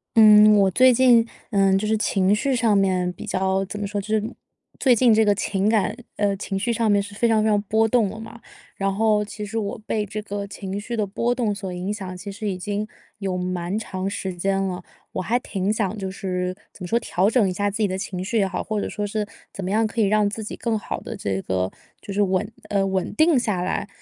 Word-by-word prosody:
嗯， 215 -1 +8
我 195 -2 +4
最 255 +6 +6
近， 240 -2 +5 0.2
嗯， 195 -1 +4
就 205 - -2
是 220 - +2
情 195 -2 +2
绪 265 +5 +1
上 230 -3 +3
面 185 -2 +2
比 - - -9
较 190 +1 0
怎 210 - -6
么 205 - -2
说， 205 0 -3
就 195 - -11
是 215 -1 +1 0.6
最 255 -3 +5
近 235 0 +5
这 220 +1 +5
个 205 -1 +3
情 200 0 0
感 215 -1 +1 0.2
呃， 205 -1 +1
情 195 0 -3
绪 235 +5 0
上 230 -2 +1
面 205 0 +4
是 200 0 -8
非 235 +4 +1
常 220 -2 +3
非 220 - +2
常 210 -1 +3
波 220 +2 +2
动 225 -3 +2
的 220 +3 -8
嘛。 225 +1 -10 0.4
然 195 0 0
后 210 0 +2
其 210 0 -7
实 225 +2 -3
我 205 -2 -3
被 215 -1 -1
这 215 - -5
个 200 -1 -5
情 195 0 -5
绪 235 +3 -4
的 215 - +1
波 235 +5 -1
动 230 -5 0
所 195 -2 -6
影 180 +3 -3
响 190 -3 -6
其 200 +3 -7
实 210 +1 -4
已 185 - -3
经 205 +3 -3 0.3
有 190 -2 -2
蛮 180 +1 -2
长 190 -3 -3
时 190 -1 -4
间 195 +2 0
了， 185 -2 -3 0.3
我 - - -2
还 225 +7 +1
挺 200 -5 -2
想 215 -2 -1
就 190 -1 -3
是 185 -2 -3 0.2
怎 - - -17
么 - - -4
说， 230 +5 +2
调 195 -3 +1
整 225 -3 +3
一 185 - -1
下 205 +2 0
自 200 - -4
己 215 -2 +2
的 185 - -3
情 185 -1 -4
绪 225 +3 0
也 195 - +2
好， 185 -1 -3
或 215 -2 -2
者 - - -3
说 210 - -3
是 210 +1 -2 0.3
怎 195 - -6
么 180 - -3
样 220 +3 +2
可 225 +1 -1
以 - - +4
让 210 +1 +3
自 215 +2 -4
己 210 - -6
更 230 -2 -1
好 - - -4
地 230 - -7
这 100 - -2
个 95 0 -1 0.3
就 - - -8
是 205 +1 +2
稳 195 +2 0 0.2
呃， 200 -1 +2
稳 190 -1 -1
定 315 -1 +4
下 210 -7 0
来。 180 - -2
205 Hz, 270 characters per minute, -23 LUFS, 190-220 Hz, 0.6 s, 嗯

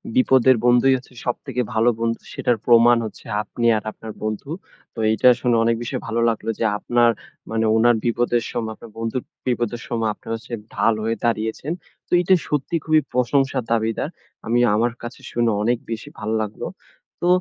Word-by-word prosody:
বিপদের 130 0 +5
বন্ধুই 125 +2 +5
হচ্ছে 130 0 -15
সবথেকে 125 +1 -2
ভালো 110 +2 +4
বন্ধু। 115 0 -1
সেটার 120 - +1
প্রমাণ 120 0 +6
হচ্ছে 110 - -9 0.2
আপনি 120 +3 -4
আর 105 - -5
আপনার 110 0 -9
বন্ধু। 110 +6 -3 0.4
তো - - -9
এইটা 110 +3 +5
শুনে 125 -2 +2
অনেক 115 0 +2
বেশি 120 - -4
ভালো 115 +1 -1
লাগলো 115 0 -3
যে - - +1
আপনার 120 +2 +3 0.4
মানে 110 0 +1
ওনার 120 +2 +5
বিপদের 120 0 +1
সময় 115 -2 -3
আপনার 115 - -13
বন্ধুর 115 +2 -2 0.2
বিপদের 120 -1 -1
সময় 115 -3 0
আপনার - - -10
হচ্ছে 120 +2 -10 0.2
ঢাল 115 - +3
হয়ে 115 +1 0
দাঁড়িয়েছেন। 110 +5 -1 0.4
তো - - -39
এইটা 180 +2 +3
সত্যি 150 +3 -1
খুবই 155 -1 +4
প্রশংসার 130 +1 +1
দাবীদার। 115 +4 0 0.4
আমি 120 +2 +2 0.2
আমার 115 +3 +2
কাছে 120 +1 -8
শুনে 120 -1 +1
অনেক 120 +2 +2
বেশি 115 0 -5
ভাল 105 - -4
লাগলো। 105 -1 -5 0.6
তো 175 - +1
120 Hz, 170 wpm, -22 LUFS, 115-125 Hz, 0.6 s, প্রমাণ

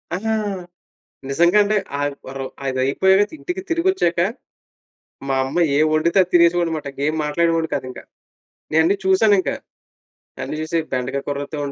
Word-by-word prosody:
అహ! 195 +5 -6 1.0
నిజంగా 170 +8 +3
అంటే, 210 +1 +1 0.2
ఆహ్, 145 0 -1
వర్ 135 +1 -7 0.3
అది 130 -1 -1
అయిపోయాక 190 +9 +3
ఇంటికి 365 +1 -4
తిరిగొచ్చాక. 335 - +1 1.1
మా 135 - +1
అమ్మ 135 +6 -3 0.2
ఏం 155 +2 +4
వండితే 160 +4 +2
అది 180 - -5
తినేసేవాడిని 170 0 +4
అనమాట. 155 -2 -4
ఇగేం 150 +3 -1
మాట్లాడేవాడిని 165 +1 +1
కాదింక. 130 -2 -5 0.7
నేఅన్ని 160 +5 +3
చూశానింకా, 190 -4 +3 0.9
అన్ని 155 - -4
చూసి 165 +2 -1
బెండకాయ 130 +2 -2
కూరతో 145 +1 -4
165 Hz, 130 wpm, -20 LUFS, 145-190 Hz, 1.1 s, ఏం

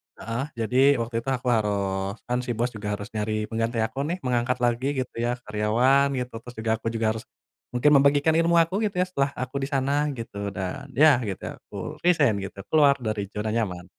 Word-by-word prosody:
heeh, 115 +3 -4
jadi 130 +5 +3
waktu 115 -1 -3
itu 115 - -12
aku 130 -1 -1
harus 100 -3 0
kan 125 0 -1
si 125 -1 -3
bos 120 +2 0
juga 105 -1 -3
harus 100 +1 -8
nyari 110 0 -1
pengganti 115 0 0
aku 115 +4 -4
nih, 170 - -1
mengangkat 125 0 0
lagi 120 +2 +1 0.2
gitu - - -20
ya 120 +1 0
karyawan 120 +6 +3
gitu. 125 -1 -4
Terus 120 +1 -12
juga, 110 0 -2
aku 115 - -5
juga 115 0 -1
harus 110 0 -5 0.5
mungkin, 150 +5 +4
membagikan 145 +3 +4
ilmu 170 +1 +3
aku, 185 +5 -3
gitu 200 - -8
ya, - - -2
setelah 140 -6 -1
aku 130 +1 -5
di 135 - -2
sana 140 +1 +1
gitu, 100 -4 -5
dan 135 +9 -4
ya 150 -2 +6
gitu, 95 - -5 0.2
aku - - -16 0.2
resign 150 - +3
gitu, 100 0 -7
keluar 145 -3 +6
dari 105 -2 -2
zona 105 +1 -2
nyaman. 95 -6 -2
120 Hz, 200 wpm, -25 LUFS, 110-135 Hz, 0.5 s, ya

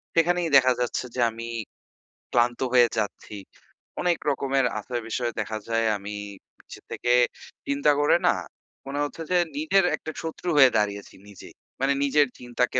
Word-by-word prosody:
সেখানেই 170 0 +2
দেখা 130 -1 +5
যাচ্ছে 125 +1 -2
যে 125 - 0
আমি 115 +1 -7 0.8
ক্লান্ত 120 -1 +2
হয়ে 120 -1 +6
যাচ্ছি। 105 0 -4 0.6
অনেক 175 -2 +2
রকমের 135 -1 0
আছে 120 +4 -7
বিষয়ে 120 +1 -2
দেখা 110 +1 -4
যায় 115 0 +1
আমি 100 +1 -7 0.4
পিছে - - -12
থেকে 120 - 0 0.5
চিন্তা 140 +1 +2
করে 145 +3 +4
না, - - +4 0.5
মনে 140 +1 -3
হচ্ছে 145 +3 -5
যে, 180 - +4 0.2
নিজের 295 -11 +3
একটা 155 - -7
শত্রু 165 +2 -5
হয়ে 135 -2 +8
দাঁড়িয়েছি 100 -1 -2
নিজেই। 100 - -13 0.3
মানে 135 +1 +3
নিজের 145 +1 +3
চিন্তাকে 125 +1 -1
130 Hz, 150 wpm, -25 LUFS, 115-145 Hz, 0.8 s, হয়ে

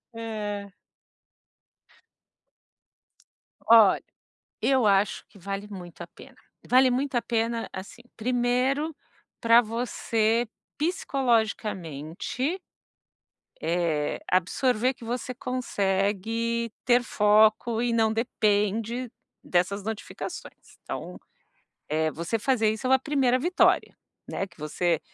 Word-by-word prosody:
É. 210 -3 -4 3.0
Olha, 225 -4 +7 0.6
eu 265 -4 +3
acho 200 0 +2
que - - -19
vale 195 +2 -5
muito 180 -4 -9
a - - -6
pena. - - -16 0.3
Vale 255 +1 +5
muito 260 +2 -1
a 240 - +3
pena, 230 0 -1
assim, 190 +1 -9 0.2
1º 250 +6 0 0.4
para 230 +1 +6
você 230 0 0 0.3
psicologicamente, 230 - -1 1.0
eh, 160 -3 0
absorver 225 +7 +2
que 240 - -15
você 245 +2 -3
consegue 230 -1 -1
ter 245 0 +4
foco 215 +1 +3
e 240 0 +1
não 225 -1 +3
depende 220 +1 0 0.3
dessas 185 +3 0
notificações. 220 0 -7
Então, - - -6 0.7
eh, 155 +1 +1
você 170 +9 -2
fazer 225 -2 +2
isso 220 +3 -5
é 260 - +5
a - - +5
primeira 265 -2 +2
vitória, 350 +7 +2 0.3
né, 195 - -3
que 175 - -23
você 160 +2 0
225 Hz, 100 wpm, -26 LUFS, 200-245 Hz, 3.0 s, Olha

